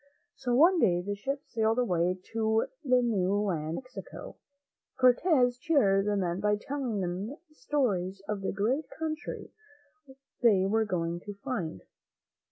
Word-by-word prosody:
So 245 -3 -1
one 340 +7 +6
day 180 - +3
the 205 +2 -2
ships 275 +8 -5
sailed 225 -1 +2
away 180 -6 +1 0.2
to 220 0 +2 0.2
the 255 -3 +3
new 200 -5 +1
land 170 -6 -1
of - - -6
Mexico. 245 -7 -9 0.6
Cortez 250 -1 +4
cheered 205 -11 +3
the 210 - +1
men 180 -2 -1
by 210 +1 +2
telling 255 -6 -3
them 185 +8 -3 0.2
stories 200 -12 -1
of 210 -2 -3
the 195 - -1
great 240 +10 0
country 310 -1 -5 0.9
they 205 -6 +5
were 220 +3 +2
going 170 -3 -2
to 205 +3 -8
find. 170 - -4
220 Hz, 145 wpm, -29 LUFS, 190-255 Hz, 0.9 s, one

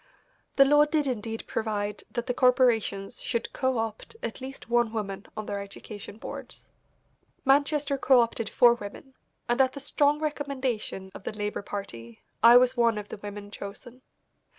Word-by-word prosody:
The 275 - +7
law 295 +2 +6
did 300 -1 0
indeed 225 -3 -3
provide 210 -2 -2
that 240 -1 -3
the 250 - -1
corporations 245 -6 +2
should 235 -2 -2
co 260 -2 0
opt 225 - -4
at 230 - -4
least 265 0 -8
one 240 -1 +2
woman 200 -3 -4
on 215 - -3
their 200 - -3
education 200 +1 -9
boards. - - -9 0.7
Manchester 285 +1 +2
co 260 -1 +5
opted 230 -2 -2
four 240 -1 +6
women, 235 +4 -9 0.3
and 240 +2 +3
at 260 -1 +3
the 280 - -6
strong 290 +1 +2
recommendation 265 -10 -3
of - - -10
the - - -3
Labour 210 0 -2
Party, 115 - -7 0.2
I 235 +1 +9
was 255 +1 +4
one 235 -3 +3
of 205 0 -6
the - - -6
women 205 0 -8
chosen. 235 +6 -9
235 Hz, 165 wpm, -27 LUFS, 210-265 Hz, 0.7 s, I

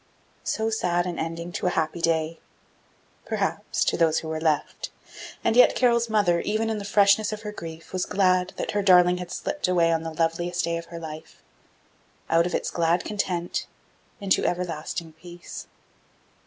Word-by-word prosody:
So 220 0 -1
sad 175 -5 +1
an 175 -2 -4
ending 165 +2 -4
to 180 - -2
a 180 - -1
happy 160 +1 -1
day! 165 0 0 0.9
Perhaps - - -1
to - - +1
those 160 -2 +3
who 160 - -3
were 160 0 -3
left 155 -2 -1 0.5
and 225 - +2
yet 250 - +7
Carol's 235 -2 +3
mother, 205 -6 +3
even 220 +3 -1
in 215 - -2
the 200 - -6
freshness 200 +1 +4
of 215 +1 -6
her 210 - -4
grief, 165 -4 -9
was 185 -1 -1
glad 185 -2 +2
that - - -2
her 205 - 0
darling 180 -2 +6
had 180 -1 -6
slipped 295 +7 -2
away 170 -2 +3
on 165 -1 +1
the 165 - -4
loveliest 165 +2 -1
day 170 0 -1
of 170 - -7
her 170 - -9
life, 160 -1 -9 0.9
out 165 +1 +4
of - - -2
its - - -2
glad 170 +1 +1
content, 180 -4 -2 0.5
into 195 -2 +2
everlasting 170 -2 -3
peace. 175 +2 -10
175 Hz, 175 wpm, -25 LUFS, 165-200 Hz, 0.9 s, yet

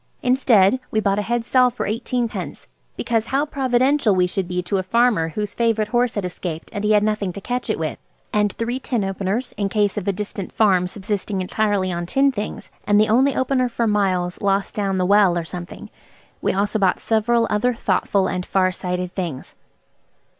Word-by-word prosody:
Instead, 250 -4 +4
we 220 - 0
bought 200 -1 +1
a - - +1
head 235 +3 -2
stall 250 0 +4
for 245 - -4
eighteenpence, 235 +2 -3 0.3
because 230 -1 -1
how 275 +2 +1
providential 260 -4 +2
we 180 -1 +3
should 180 0 -2
be 180 0 -2
to 195 +3 -1
a - - +1
farmer 220 -4 +2
whose 210 +4 -4
favourite 225 -2 0
horse 240 0 +1
had 205 -3 -2
escaped 170 -2 -6
and 205 - -4
he 210 0 +3
had 210 -1 +4
nothing 210 -3 0
to 200 - -8
catch 245 +5 -3
it - - 0
with; - - -3 0.3
and 210 -1 +2
three 240 +3 -3
tin 240 -5 -2
openers, 195 +5 -2
in 200 -1 -1
case 205 -1 0
of 205 -1 -3
a - - +3
distant 200 -1 -5
farm 185 -5 +3
subsisting 200 0 -3
entirely 195 0 0
on 170 0 -3
tinned 275 +6 +2
things, 210 -2 -5 0.2
and 205 0 +4
the 215 - +3
only 260 +5 +3
opener 260 -1 +1
for 235 0 -1
miles 185 -4 0
lost 195 0 0
down 195 -2 -1
the 185 - +1
well 195 -2 +4
or 170 - -2
something. 175 +1 -8 0.5
We - - +1
also 205 +2 0
bought 190 -2 +2
several 230 +1 +2
other 235 +4 +1
thoughtful 200 -3 +1
and 180 -1 -2
far 185 0 +1
sighted 180 0 -4
things. 170 -9 -5
210 Hz, 195 wpm, -21 LUFS, 190-235 Hz, 0.5 s, Instead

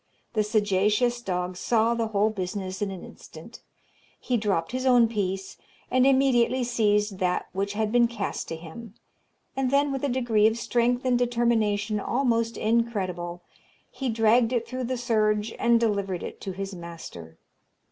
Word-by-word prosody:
The 215 - +2
sagacious 210 +3 +1
dog 180 -3 -3
saw 225 +4 +2
the 230 -1 -1
whole 215 0 +1
business 190 -1 -4
in 205 - 0
an 190 -2 -7
instant; - - -13 0.6
he 250 - -1
dropped 200 -6 0
his 255 +1 -2
own 245 -2 +6
piece, 195 -3 -3 0.3
and 255 +1 +4
immediately 260 -2 +3
seized 210 -4 +1
that 180 -2 -1
which 200 +2 -2
had 215 0 -1
been 240 0 +4
cast 230 -4 -4
to 165 - -4
him; 185 +7 -10 0.6
and 265 -1 0
then, 280 +1 +2
with 270 0 -3
a 285 - +1
degree 240 -4 +3
of 225 +1 0
strength 245 +2 0
and 250 -1 +2
determination 225 -4 +1
almost 230 -1 0
incredible, 190 -7 -1 0.5
he 265 -2 -3
dragged 225 +1 +3
it 235 -2 -1
through 255 +1 -4
the 255 +1 -2
surge 215 -2 +1
and 235 -1 +4
delivered 200 -5 -1
it - - -8
to 195 - -4
his 195 +1 -5
master. 165 - -10
220 Hz, 160 wpm, -26 LUFS, 195-240 Hz, 0.6 s, own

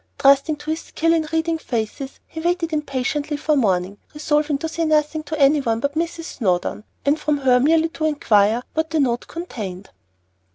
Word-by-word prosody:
Trusting 280 +3 +4
to 295 +1 -5
his 320 - -2
skill 330 +1 0
in 320 -2 +1
reading 325 0 0
faces, 240 +2 -4
he 320 - -8
waited 340 0 -1
impatiently 295 0 -2
for 305 +1 +1
morning, 195 -5 0 0.2
resolving 300 -1 +1
to 320 - -3
say 330 +1 -2
nothing 310 0 +1
to 310 +1 -5
anyone 275 -5 +3
but 280 +4 -1
Mrs. 330 +1 -2 0.2
Snowdon, 185 -1 0 0.2
and 290 +2 +2
from 300 -1 0
her 255 -3 +4
merely 320 +4 +3
to 315 -1 -3
inquire 225 -6 +2
what 320 0 -1
the 320 - 0
note 245 -4 0
contained. 205 - -7
295 Hz, 175 wpm, -21 LUFS, 250-320 Hz, 0.2 s, Trusting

